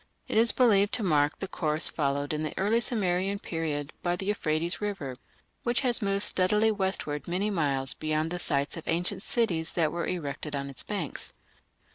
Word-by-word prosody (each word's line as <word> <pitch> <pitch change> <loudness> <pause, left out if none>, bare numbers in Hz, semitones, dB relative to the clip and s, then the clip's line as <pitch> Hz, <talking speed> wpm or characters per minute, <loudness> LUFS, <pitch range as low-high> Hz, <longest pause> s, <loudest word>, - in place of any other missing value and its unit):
It - - -4
is 225 0 +6
believed 210 -3 +4
to 230 - 0
mark 150 -4 +2
the 195 - -4
course 155 -4 +2
followed 145 -1 -1
in 150 - -2
the 155 - -4
early 210 +4 +2
Sumerian 195 -4 +2
period 155 -5 -3
by 175 0 0
the 190 - -5
Euphrates 170 -4 0
river, 195 -11 -3 0.5
which 240 0 +1
has 245 -3 +1
moved 200 0 +1
steadily 210 +4 +3
westward 190 -7 -2
many 190 +5 0
miles 140 -7 0
beyond 155 +1 -1
the 180 - -2
sites 140 -4 0
of 165 - -8
ancient 180 +4 0
cities 180 -9 0
that 160 -3 +1
were 170 0 -3
erected 150 -3 -4
on 140 0 -4
its 130 - -3
banks. 195 -8 -5
175 Hz, 180 wpm, -28 LUFS, 150-200 Hz, 0.5 s, is